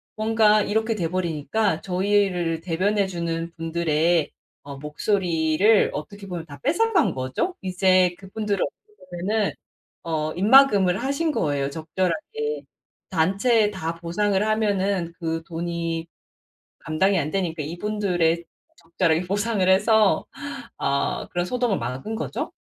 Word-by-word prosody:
뭔가 215 Hz, -1 st, +3 dB
이렇게 220 Hz, +2 st, 0 dB
돼 175 Hz, -6 st, -1 dB
버리니까 170 Hz, +2 st, -1 dB
저희를 185 Hz, -3 st, +1 dB
대변해 190 Hz, +4 st, +1 dB
주는 170 Hz, -2 st, -3 dB
분들의 165 Hz, 0 st, +1 dB, 0.3 s
어 140 Hz, -1 st, -8 dB
목소리를 170 Hz, +5 st, +2 dB
어떻게 200 Hz, +7 st, -7 dB
보면 175 Hz, -3 st, -5 dB
다 145 Hz, -3 st, -11 dB
뺏어간 350 Hz, -, +2 dB
거죠. 130 Hz, -, -2 dB
이제 185 Hz, -1 st, +3 dB
그분들을 200 Hz, 0 st, -2 dB
어떻게 425 Hz, 0 st, -8 dB, 0.3 s
보면은 210 Hz, +1 st, +1 dB, 0.5 s
어 155 Hz, -2 st, -2 dB
입막음을 200 Hz, -3 st, +5 dB
하신 280 Hz, +4 st, 0 dB
거예요 145 Hz, -, 0 dB
적절하게. 190 Hz, -, -3 dB, 0.5 s
단체에 200 Hz, +6 st, +2 dB
다 170 Hz, -5 st, -4 dB
보상을 190 Hz, +4 st, 0 dB
하면은 200 Hz, -5 st, 0 dB
그 165 Hz, -2 st, -2 dB
돈이 165 Hz, -1 st, -3 dB, 0.7 s
감당이 190 Hz, +5 st, +1 dB
안 150 Hz, -, -2 dB
되니까 170 Hz, -5 st, -2 dB
이분들에 175 Hz, -1 st, 0 dB, 0.3 s
적절하게 165 Hz, 0 st, 0 dB
보상을 205 Hz, 0 st, 0 dB
해서 210 Hz, +2 st, +4 dB, 0.5 s
아 140 Hz, 0 st, -1 dB
그런 175 Hz, 0 st, -1 dB
소동을 245 Hz, -2 st, 0 dB
막은 130 Hz, -, -4 dB
거죠. 220 Hz, -, -4 dB
185 Hz, 280 characters per minute, -24 LUFS, 165-210 Hz, 0.7 s, 입막음을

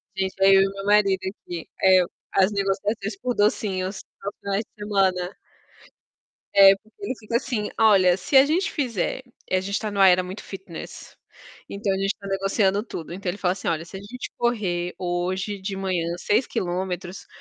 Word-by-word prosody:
Gente, 190 Hz, 0 st, -2 dB
eu 195 Hz, 0 st, +7 dB
e 195 Hz, -, +2 dB
meu 195 Hz, 0 st, -7 dB
marido 205 Hz, -2 st, +4 dB
aqui, 180 Hz, -3 st, -6 dB, 0.2 s
é, 185 Hz, -1 st, +7 dB, 0.3 s
as 195 Hz, +1 st, +4 dB
negociações 200 Hz, +1 st, -1 dB
por 250 Hz, 0 st, -1 dB
docinhos 195 Hz, -2 st, 0 dB, 0.2 s
aos 200 Hz, -, -4 dB
finais 200 Hz, +2 st, -2 dB
de 210 Hz, -, -12 dB
semana. 190 Hz, -3 st, 0 dB, 1.2 s
É, 195 Hz, 0 st, +9 dB
porque 220 Hz, +3 st, -24 dB
ele 265 Hz, -, -2 dB
fica 230 Hz, +1 st, -5 dB
assim: 215 Hz, -4 st, -3 dB
"Olha, 190 Hz, -5 st, +5 dB
se 230 Hz, +9 st, -3 dB
a 265 Hz, -, +8 dB
gente 340 Hz, +6 st, 0 dB
fizer", 250 Hz, -, -2 dB, 0.3 s
e -, -, +1 dB
a 185 Hz, -, +2 dB
gente 200 Hz, +2 st, -2 dB
tá 215 Hz, -, -4 dB
numa 195 Hz, -1 st, +5 dB
era 180 Hz, 0 st, +5 dB
muito 185 Hz, +3 st, -8 dB
fitness, 190 Hz, -4 st, -9 dB, 0.5 s
então 200 Hz, -1 st, -1 dB
a -, -, -1 dB
gente 195 Hz, +1 st, 0 dB
tá 200 Hz, -, -9 dB
negociando 195 Hz, +1 st, +1 dB
tudo. 170 Hz, -7 st, -7 dB
Então 185 Hz, 0 st, -4 dB
ele 190 Hz, -, -3 dB
fala 180 Hz, -3 st, +1 dB
assim: 190 Hz, -, -5 dB
"Olha, 165 Hz, 0 st, -1 dB
se 190 Hz, -, -9 dB
a -, -, -7 dB
gente 250 Hz, +6 st, -8 dB
correr 185 Hz, -7 st, -1 dB
hoje 185 Hz, +3 st, -2 dB
de 195 Hz, +1 st, -4 dB
manhã 185 Hz, -3 st, -1 dB
6km, 185 Hz, -4 st, -2 dB
195 Hz, 180 wpm, -24 LUFS, 185-210 Hz, 1.2 s, É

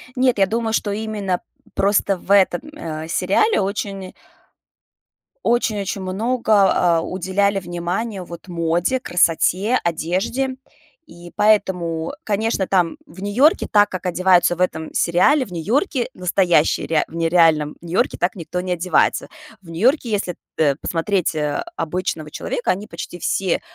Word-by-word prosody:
Нет, 255 Hz, -3 st, +2 dB
я 195 Hz, -, +5 dB
думаю, 225 Hz, +2 st, -2 dB
что 205 Hz, -2 st, 0 dB
именно 205 Hz, -4 st, -2 dB, 0.3 s
просто 195 Hz, -1 st, +2 dB
в 195 Hz, -, -7 dB
этом, 195 Hz, -2 st, +4 dB
э, 160 Hz, -, -6 dB
сериале 200 Hz, -, +2 dB
очень 195 Hz, -1 st, -4 dB, 1.3 s
Очень 235 Hz, -3 st, +1 dB
очень 195 Hz, 0 st, -3 dB
много, 210 Hz, +1 st, +2 dB, 0.2 s
а, -, -, 0 dB
уделяли 190 Hz, +3 st, 0 dB
внимания 180 Hz, +4 st, -4 dB
вот 170 Hz, +2 st, -11 dB
моде, 175 Hz, +8 st, 0 dB
красоте, 185 Hz, +4 st, +2 dB
одежде. 190 Hz, +11 st, -1 dB, 0.5 s
И 175 Hz, 0 st, -13 dB
поэтому, 180 Hz, -5 st, +1 dB
конечно, 210 Hz, -1 st, 0 dB
там 180 Hz, -3 st, +1 dB
в 180 Hz, +4 st, -13 dB
Нью-Йорке, 245 Hz, +11 st, +3 dB
так 205 Hz, -1 st, +5 dB
как 185 Hz, 0 st, -5 dB
одеваются 180 Hz, -1 st, +3 dB
в -, -, -17 dB
этом 160 Hz, -3 st, -1 dB
сериале, 250 Hz, -, +3 dB
в 195 Hz, -, -15 dB
Нью-Йорке, 240 Hz, -, 0 dB
настоящие, 180 Hz, -3 st, +2 dB
реа 160 Hz, -2 st, +2 dB
в -, -, -18 dB
нереальном 165 Hz, -3 st, +3 dB
Нью-Йорке 170 Hz, +1 st, -1 dB
так 175 Hz, -, 0 dB
никто 180 Hz, -1 st, -5 dB
не 185 Hz, 0 st, -4 dB
одевается. 180 Hz, +1 st, +1 dB, 0.3 s
В 170 Hz, -, -16 dB
Нью-Йорке, 240 Hz, -, +1 dB
если 200 Hz, -4 st, -2 dB, 0.2 s
тэ 145 Hz, -3 st, +2 dB
посмотреть, 175 Hz, 0 st, -1 dB
э, 150 Hz, -1 st, -1 dB
обычного 160 Hz, -2 st, -3 dB
человека, 240 Hz, -, -2 dB
они 200 Hz, +3 st, -4 dB
почти 170 Hz, +1 st, -8 dB
все, 190 Hz, +1 st, 0 dB
185 Hz, 140 wpm, -20 LUFS, 170-210 Hz, 1.3 s, я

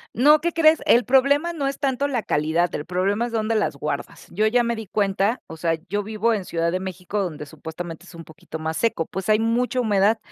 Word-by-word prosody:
No, 295 Hz, +6 st, +6 dB
¿qué 340 Hz, +1 st, -1 dB
crees? 320 Hz, -1 st, +4 dB
el 240 Hz, +1 st, +5 dB
problema 280 Hz, +6 st, +3 dB
no 285 Hz, -4 st, -2 dB
es 275 Hz, -, -3 dB
tanto 275 Hz, 0 st, 0 dB
la 250 Hz, -6 st, -2 dB
calidad, 160 Hz, +3 st, 0 dB
el 145 Hz, -, -3 dB
problema 195 Hz, +6 st, 0 dB
es -, -, -9 dB
donde 225 Hz, 0 st, 0 dB
las 180 Hz, -9 st, 0 dB
guardas. 140 Hz, 0 st, -5 dB
Yo 215 Hz, +5 st, +1 dB
ya 240 Hz, +2 st, +3 dB
me 235 Hz, 0 st, -1 dB
di 220 Hz, -3 st, -7 dB
cuenta, 200 Hz, +3 st, 0 dB
o 160 Hz, -, -9 dB
sea, 165 Hz, 0 st, 0 dB
yo 205 Hz, +3 st, -1 dB
vivo 220 Hz, +2 st, 0 dB
en 200 Hz, -4 st, -3 dB
Ciudad 170 Hz, -1 st, -1 dB
de 185 Hz, -, -1 dB
México, 190 Hz, +2 st, -4 dB
donde 155 Hz, -6 st, -4 dB
supuestamente 160 Hz, +3 st, -8 dB
es 175 Hz, -, -13 dB
un 165 Hz, -, -9 dB
poquito 160 Hz, 0 st, -10 dB
más 160 Hz, 0 st, -3 dB
seco, 225 Hz, -8 st, 0 dB
pues 190 Hz, +4 st, -6 dB
hay 215 Hz, -, +5 dB
mucha 240 Hz, +3 st, 0 dB
humedad. 210 Hz, -1 st, +3 dB
205 Hz, 235 wpm, -23 LUFS, 170-240 Hz, -, No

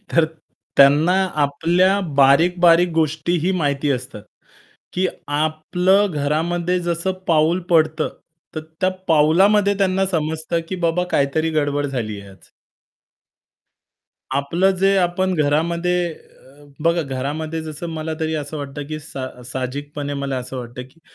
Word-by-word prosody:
तर 165 Hz, -, +4 dB, 0.5 s
त्यांना 145 Hz, +5 st, +6 dB, 0.3 s
आपल्या 175 Hz, +7 st, +2 dB, 0.2 s
बारीक-बारीक 170 Hz, +5 st, +5 dB
गोष्टीही 160 Hz, +3 st, 0 dB
माहिती 145 Hz, -2 st, 0 dB
असतात, 125 Hz, -5 st, -4 dB, 0.7 s
की 185 Hz, +1 st, +1 dB, 0.2 s
आपलं 155 Hz, +6 st, +1 dB
घरामध्ये 170 Hz, +5 st, 0 dB
जसं 175 Hz, +2 st, -1 dB, 0.2 s
पाऊल 165 Hz, +3 st, +3 dB
पडतं, 155 Hz, -1 st, +2 dB, 0.5 s
तर 155 Hz, -, -3 dB, 0.2 s
त्या 185 Hz, -, +3 dB, 0.2 s
पाऊलामध्ये 190 Hz, +7 st, +4 dB
त्यांना 190 Hz, 0 st, +1 dB
समजतं 160 Hz, -1 st, -1 dB
की 185 Hz, -, -3 dB
बाबा 180 Hz, +2 st, +1 dB
काहीतरी 150 Hz, +3 st, +1 dB
गडबड 145 Hz, -2 st, 0 dB
झालीये 110 Hz, -7 st, -5 dB
आज. 95 Hz, 0 st, -18 dB, 1.9 s
आपलं 170 Hz, +7 st, +2 dB
जे 195 Hz, +1 st, +3 dB
आपण 185 Hz, +1 st, +1 dB
घरामध्ये 170 Hz, +4 st, +1 dB
अ, 145 Hz, -1 st, -19 dB, 0.2 s
बघा 170 Hz, 0 st, +2 dB
घरामध्ये 150 Hz, +4 st, -4 dB
जसं 155 Hz, +1 st, -6 dB
मला 160 Hz, 0 st, -4 dB
तरी 160 Hz, 0 st, -1 dB
असं 150 Hz, 0 st, -4 dB
वाटतं 145 Hz, 0 st, -6 dB
की 155 Hz, +1 st, -5 dB
सा 130 Hz, -3 st, -8 dB
साहजिकपणे 140 Hz, +3 st, -5 dB
मला 140 Hz, -1 st, -3 dB
असं 130 Hz, +1 st, -5 dB
वाटतं 120 Hz, 0 st, -7 dB
की 165 Hz, -, -27 dB
155 Hz, 120 wpm, -20 LUFS, 140-175 Hz, 1.9 s, त्यांना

